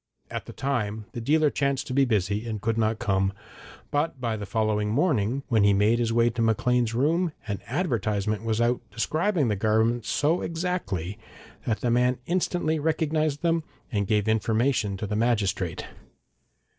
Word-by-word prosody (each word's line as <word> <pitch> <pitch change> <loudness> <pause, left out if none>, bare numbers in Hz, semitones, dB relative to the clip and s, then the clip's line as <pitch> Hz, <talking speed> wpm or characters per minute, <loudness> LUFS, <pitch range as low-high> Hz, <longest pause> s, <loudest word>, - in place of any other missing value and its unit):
At - - -5
the - - -7
time, 110 -6 -2
the 120 - -5
dealer 150 +4 +3
chanced 140 -1 0
to 130 - -5
be 135 +1 +4
busy 105 -1 0
and 110 -2 -3
could 115 +2 -1
not 110 -1 +1
come, 95 -2 +1 0.6
and 145 +3 +1
by 115 -3 -1
the 105 -2 -6
following 105 0 0
morning, 130 - +1
when 115 -5 +3
he 100 0 +5
made 105 +4 +3
his 115 -1 +1
way 120 +1 +3
to 115 +1 -3
Maclean's 115 +1 +2
rooms, 160 +6 +1
an 100 -3 -2
advertisement 110 - -1
was 110 -1 0
out 120 +1 +2
describing 155 - 0
the 105 - +1
garments 110 +2 +1
so 155 +4 +1
exactly 140 - -3 0.5
that 110 -2 0
the 120 - +1
man 125 +1 +3
instantly 175 -3 0
recognised 155 -1 0
them, 165 -1 +2 0.3
and 100 -4 0
gave 105 0 +1
information 110 -1 +1
to 105 - -4
the 105 +1 -3
magistrate. 100 -6 0
115 Hz, 170 wpm, -26 LUFS, 105-140 Hz, 0.6 s, he